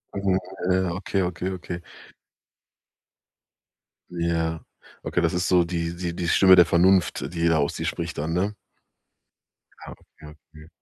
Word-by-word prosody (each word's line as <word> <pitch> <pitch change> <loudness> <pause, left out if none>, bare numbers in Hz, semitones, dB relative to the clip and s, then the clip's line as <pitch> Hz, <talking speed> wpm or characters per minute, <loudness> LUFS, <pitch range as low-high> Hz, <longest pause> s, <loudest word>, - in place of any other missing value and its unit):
Mhm, 100 -1 +1 0.3
ja, 95 -1 +1
okay, 95 +1 -2
okay, 90 +1 -3
okay. 90 -1 -6 2.3
Ja, 85 -2 -2 0.4
okay, 90 - -1
das 85 -1 +1
ist 90 +1 -1
so 90 -1 +4
die 85 0 -3
die 85 -1 -4
die 85 -1 -3
Stimme 95 +2 +6
der 90 - +7
Vernunft, 85 -2 +2
die 85 -1 0
da 80 - +3
aus 70 -2 0
dir - - -4
spricht - - -4
dann, 80 +3 -2
ne? 100 +4 -1 1.3
Ja, - - -9
okay, 75 - -18
okay. 75 +1 -16
85 Hz, 145 wpm, -24 LUFS, 80-90 Hz, 2.3 s, der